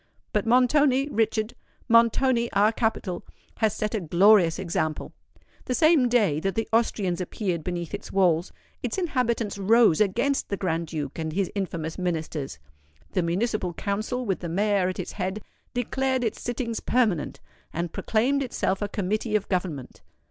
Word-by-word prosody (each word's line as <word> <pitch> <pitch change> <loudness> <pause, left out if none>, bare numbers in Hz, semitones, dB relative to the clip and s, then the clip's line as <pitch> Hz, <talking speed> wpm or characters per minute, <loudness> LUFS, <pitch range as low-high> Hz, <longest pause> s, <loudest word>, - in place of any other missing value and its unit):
But 210 +1 0
Montoni, 260 +3 +4
Richard,—Montoni, 230 +1 +1
our 205 +2 +4
capital, 220 -6 -2 0.3
has 220 -2 +1
set 215 +1 -2
a 220 - 0
glorious 175 +1 +5
example. 160 -4 -2 0.5
The 250 - -1
same 310 -5 +4
day 210 -11 +2
that 195 +3 -2
the 225 - -1
Austrians 200 -6 +1
appeared 180 -2 -3
beneath 175 0 -4
its 205 - -6
walls, 180 -3 +2 0.3
its - - -3
inhabitants 235 - -1
rose 215 -3 +4
against 240 +8 +1
the 200 - -2
Grand 170 -3 -1
Duke 150 -2 -5
and 160 -1 -2
his 195 0 -1
infamous 170 -5 -4
Ministers. 160 - -3 0.5
The - - +1
Municipal 180 +1 -1
Council, 215 +5 -2
with 195 -4 -1
the 170 - -5
Mayor 195 +1 +1
at 185 - -5
its - - -4
head, 190 +2 -4 0.3
declared 260 +1 0
its 225 - -2
sittings 235 -1 -3
permanent, 180 - 0 0.3
and 170 0 -3
proclaimed 255 +6 +1
itself 225 -7 -1
a 205 - 0
Committee 210 +2 -2
of 205 -2 0
Government. 175 -8 -3
205 Hz, 150 wpm, -26 LUFS, 175-235 Hz, 0.5 s, glorious